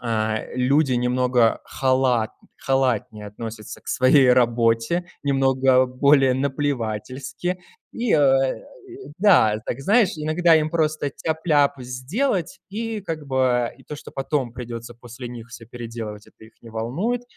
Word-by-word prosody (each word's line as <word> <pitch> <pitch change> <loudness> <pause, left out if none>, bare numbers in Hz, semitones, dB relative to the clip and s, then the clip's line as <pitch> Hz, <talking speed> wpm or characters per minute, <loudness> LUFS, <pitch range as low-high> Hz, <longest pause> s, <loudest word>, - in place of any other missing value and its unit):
а, 110 -2 -1
люди 135 +2 +2
немного 125 -1 +2
халат 130 -4 +1 0.3
халатнее 125 -5 -1
относятся 110 +1 -8
к - - -14
своей 130 0 +5
работе, 120 +7 +2 0.2
немного 135 -2 +3
более 135 0 +3
наплевательски, 135 +4 -3 0.3
и 235 -2 -1 1.1
да, 165 - +5
так, 130 - -4
знаешь, 205 - +3
иногда 160 +2 +3
им 155 0 +1
просто 155 -3 0
тяп-ляп 155 -2 +1
сделать, 175 - -2
и 225 +1 -4
как 160 -6 -6
бы, 130 -3 +1
и - - -18
то 150 - -7
что, - - -11
потом 135 -3 -2
придется 120 -1 -7
после 120 +1 -10
них 120 -1 -9
всё 115 -1 -11
переделывать- 115 -3 -8
это - - -18
их 110 - -17
не 115 - -13
волнует. 165 - -2
130 Hz, 130 wpm, -22 LUFS, 120-150 Hz, 1.1 s, своей